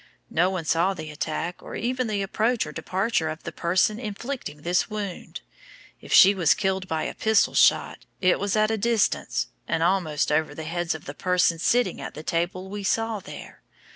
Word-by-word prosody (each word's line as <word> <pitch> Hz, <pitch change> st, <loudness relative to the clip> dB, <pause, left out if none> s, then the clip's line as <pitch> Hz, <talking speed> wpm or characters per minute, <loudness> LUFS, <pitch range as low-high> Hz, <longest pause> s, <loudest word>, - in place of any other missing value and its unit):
No 180 Hz, +3 st, +3 dB
one 185 Hz, -4 st, -3 dB
saw 170 Hz, +5 st, +2 dB
the 155 Hz, -2 st, -7 dB
attack, 155 Hz, +3 st, -4 dB
or -, -, -8 dB
even 255 Hz, +1 st, -1 dB
the 205 Hz, -2 st, -1 dB
approach 220 Hz, +4 st, 0 dB
or -, -, -7 dB
departure 190 Hz, -4 st, -1 dB
of 155 Hz, +1 st, -7 dB
the -, -, -5 dB
person 185 Hz, +5 st, +1 dB
inflicting 215 Hz, -, -6 dB
this 180 Hz, +4 st, +1 dB
wound. 205 Hz, -, -6 dB, 0.6 s
If -, -, -12 dB
she 195 Hz, +2 st, +8 dB
was 175 Hz, -6 st, +3 dB
killed 190 Hz, 0 st, -1 dB
by 160 Hz, -2 st, -1 dB
a -, -, -3 dB
pistol 220 Hz, -2 st, +2 dB
shot, -, -, +3 dB, 0.2 s
it 185 Hz, -1 st, +3 dB
was 200 Hz, 0 st, -1 dB
at 215 Hz, 0 st, +3 dB
a 220 Hz, -, -1 dB
distance, 230 Hz, 0 st, 0 dB, 0.2 s
and 165 Hz, -1 st, 0 dB
almost 170 Hz, -5 st, +1 dB
over 155 Hz, -1 st, 0 dB
the 160 Hz, -, -6 dB
heads 165 Hz, +1 st, -2 dB
of 160 Hz, -, -10 dB
the 145 Hz, -, -6 dB
persons 180 Hz, 0 st, +1 dB
sitting 245 Hz, +6 st, +1 dB
at -, -, -7 dB
the 155 Hz, -, -8 dB
table 175 Hz, +3 st, -2 dB
we 205 Hz, +1 st, -6 dB
saw 225 Hz, +1 st, 0 dB
there. -, -, -11 dB
185 Hz, 195 wpm, -25 LUFS, 165-215 Hz, 0.6 s, she